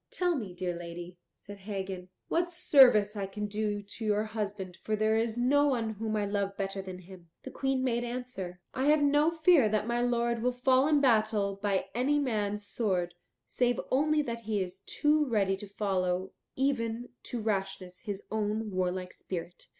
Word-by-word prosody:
"Tell 355 -2 0
me, 205 - -5
dear 180 -1 -2
lady," 175 +1 -8
said 205 0 -12
Hagen, 190 -2 -5 0.2
"what 345 +1 +1
service 260 - +5
I 200 -2 -2
can 210 +2 -4
do 205 0 -2
to 205 +3 -9
your 210 0 +2
husband, 205 -4 -5
for 215 - -1
there 215 +1 +2
is 225 0 0
no 285 +4 +4
one 235 -5 0
whom 220 +1 -3
I 210 -1 0
love 200 -1 -2
better 195 0 -3
than 185 -1 -7
him." 180 -1 -14
The - - -7
Queen 270 -1 0
made 240 -2 0
answer, 235 -8 -5
"I 260 - -1
have 300 0 +5
no 290 +2 +4
fear 320 -7 +4
that 215 0 0
my 235 +1 0
lord 235 -1 +1
will 250 +1 +1
fall 260 +2 +3
in 300 -2 +4
battle 215 -5 +2
by 200 -2 +1
any 265 +5 +2
man's 210 -7 -1
sword, 185 -5 -1 0.3
save 245 -1 +1
only 300 +3 +3
that 235 -3 -4
he 215 -1 0
is 185 0 -4
too 300 +1 +2
ready 200 -5 +2
to 205 - -9
follow 190 -2 -1 0.2
even 245 -3 -1 0.2
to 245 - -4
rashness 195 -4 -3
his 205 -4 -5
own 215 0 -1
warlike 185 0 -2
spirit." 175 -1 -7
215 Hz, 180 wpm, -30 LUFS, 195-245 Hz, 0.3 s, service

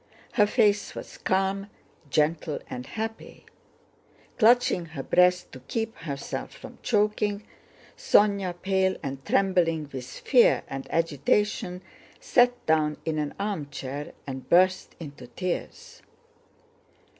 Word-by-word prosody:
Her 210 -3 +4
face 205 -2 +2
was - - -9
calm, 195 +1 0 0.4
gentle, 150 +1 +1
and 125 0 -7
happy. 225 0 -6 0.9
Clutching 230 -6 +4
her 155 -4 -7
breast 180 +2 +3
to 130 - -10
keep 225 - -4
herself 140 -3 -5
from 255 -2 -12
choking, 210 -2 +1 0.5
Sónya, 200 - +2
pale 190 0 +1
and 135 -1 -5
trembling 165 -6 +1
with 130 -2 -6
fear 240 - +3
and 135 0 -6
agitation, 180 +4 0 0.4
sat 245 0 +2
down 155 -1 +2
in 155 -1 -1
an 150 -1 -3
armchair 145 -7 -4
and 130 -1 -7
burst 185 +2 +3
into 140 -6 -9
tears. 175 +9 -5
180 Hz, 110 wpm, -26 LUFS, 145-205 Hz, 0.9 s, Her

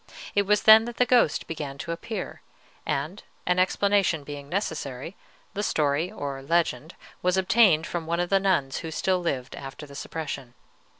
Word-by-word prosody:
It 200 -1 +2
was 210 0 +3
then 220 +1 +8
that 240 0 -7
the 250 - +4
ghost 245 - +3
began 145 -4 -5
to 165 - -5
appear; 185 +4 -5 0.5
and, 155 +9 -2 0.2
an 180 0 +2
explanation 190 -4 +2
being 145 0 -8
necessary, 160 -4 -3 0.4
the 205 - -2
story, 155 -1 0
or 140 -9 -5
legend, 160 0 0 0.3
was 180 +1 +1
obtained 190 -4 +4
from 170 -2 -4
one 170 +1 0
of 175 +1 -1
the 195 - +5
nuns 170 -9 +1
who 165 - -5
still 185 +4 0
lived 135 -7 -3
after 135 +2 -8
the 140 - -13
suppression. 140 -4 -6
170 Hz, 170 wpm, -26 LUFS, 145-195 Hz, 0.5 s, then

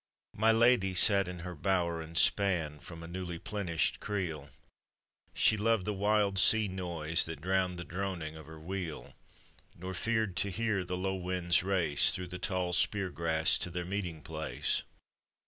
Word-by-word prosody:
My 110 +2 +3
lady 115 -4 +3
sat 100 0 +5
in 90 -1 -7
her 90 - -5
bower, 85 -1 -1
and 80 +1 -5
span 85 -7 +2
From 85 +1 -11
a - - -8
newly 85 -1 -5
plenished 85 -6 -1
creel; 85 -9 -4 0.9
She 110 - +3
loved 110 -2 +1
the 105 - -1
wild 100 -1 +1
sea 110 +1 +6
noise 85 -3 -1
that 80 -3 -6
drowned 90 +1 0
The 85 - -5
droning 90 -4 -5
of 80 -1 -12
her 80 0 -11
wheel, 85 -5 -6 0.6
Nor 95 +2 -7
feared 110 -1 -1
to 100 +3 +2
hear 110 -1 -1
the 90 0 -4
low 95 +1 -2
winds 90 -2 0
race 90 -6 +3
Through 90 -1 -5
the 90 0 -7
tall 90 -1 -2
spear 95 +2 0
grass 80 +1 +2
to - - -2
their 90 0 -4
meeting 90 -5 -4
place. 80 +2 -2
90 Hz, 165 wpm, -31 LUFS, 85-100 Hz, 0.9 s, sea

